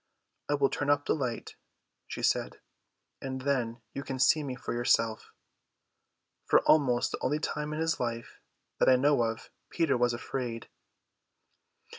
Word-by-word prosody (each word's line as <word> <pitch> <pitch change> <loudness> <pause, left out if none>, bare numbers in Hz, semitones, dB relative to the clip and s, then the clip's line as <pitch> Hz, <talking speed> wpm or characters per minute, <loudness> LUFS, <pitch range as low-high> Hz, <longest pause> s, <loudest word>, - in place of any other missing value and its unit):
"I 145 - +3
will 140 -1 +2
turn 145 - -2
up 145 0 +2
the - - +2
light," 125 -6 -4 0.5
she - - -6
said, - - 0 0.6
"and 130 -1 -5
then 125 -4 -1
you 140 - -4
can 135 -1 -5
see 140 0 +2
for 125 - -5
yourself." 115 -2 +1 1.2
For - - +5
almost 130 -5 +3
the - - -4
only 145 +3 +1
time 150 -1 -3
in 155 - -4
his 165 0 0
life 115 -1 -4 0.4
that - - +4
I 130 - +7
know 140 +1 +3
of, 115 -1 -3 0.2
Peter 160 -6 +1
was 120 0 +2
afraid. 120 -1 -5
130 Hz, 150 wpm, -29 LUFS, 120-145 Hz, 1.2 s, I